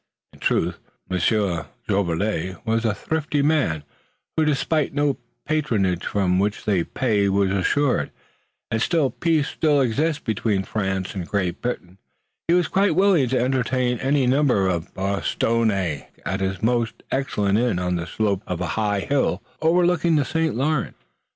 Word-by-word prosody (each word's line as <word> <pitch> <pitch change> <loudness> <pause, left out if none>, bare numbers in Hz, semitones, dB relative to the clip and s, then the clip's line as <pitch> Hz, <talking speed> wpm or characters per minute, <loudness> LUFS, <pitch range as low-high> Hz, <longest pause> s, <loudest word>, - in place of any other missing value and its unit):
In - - -17
truth, - - 0 0.3
Monsieur 90 -4 +1 0.2
Jolivet 95 -1 0
was 115 0 0
a 110 -2 +1
thrifty 150 +4 -1
man 140 - +1 0.5
who 160 - +2
despised 150 0 0
no 145 -1 +1 0.3
patronage 110 - 0
for 100 -2 0
which 95 +3 0
the 95 -5 +2
pay 105 -6 +1
was 100 0 +2
assured, 125 +8 +1 0.6
and 115 - 0
since 150 -1 +1
peace 160 -3 +2
still 150 -3 +2
existed 145 +5 0
between 105 -3 0
France 95 -2 -2
and 90 -4 -5
Great 95 -4 -1
Britain 95 -6 -4 0.5
he 170 - +4
was 180 -2 +2
quite 195 -3 +2
willing 185 -9 +4
to 130 - +1
entertain 125 -1 0
any 135 0 +2
number 125 -7 +3
of 85 -3 -2
Bostonnais 100 -3 0 0.2
at 95 +2 -1
his 95 0 -2
most 115 -1 0
excellent 105 -7 +1
inn 120 -6 +1
on 90 0 -1
the 85 0 -3
slope 100 -2 0
of 90 -2 -3
a 90 - -2
high 105 -2 0
hill 130 -7 0 0.2
overlooking 170 0 +3
the 145 -2 +2
St. 160 -1 0
Lawrence. 145 +4 -1
115 Hz, 150 wpm, -23 LUFS, 95-145 Hz, 0.6 s, he